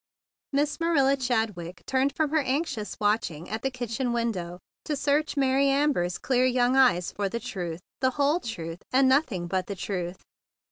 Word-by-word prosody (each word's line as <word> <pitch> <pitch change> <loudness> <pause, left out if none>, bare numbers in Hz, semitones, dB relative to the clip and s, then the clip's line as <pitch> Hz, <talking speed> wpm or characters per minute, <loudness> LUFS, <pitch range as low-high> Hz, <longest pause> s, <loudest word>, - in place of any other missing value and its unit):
Miss 290 +3 0
Marilla 285 -5 +3
Chadwick 220 -9 -2
turned 265 +1 +1
from 310 -2 0
her 315 - +3
anxious 265 -6 -2
watching 205 -6 0
at 220 +2 -4
the 270 - 0
kitchen 245 -1 -3
window 190 -8 -2 0.3
to 300 - -1
search 290 +2 0
Mary 270 0 +3
Amber's 275 -11 +1
clear 255 -1 +1
young 250 0 +2
eyes 245 -10 +4
for 200 -1 -2
the 235 - -3
truth, 175 -6 -5 0.2
the 260 - +3
whole 290 +4 +3
truth, 170 - -6
and 265 +1 +4
nothing 260 - +2
but 185 +1 -2
the 200 - -4
truth. 180 -2 -4
245 Hz, 170 wpm, -27 LUFS, 190-275 Hz, 0.3 s, eyes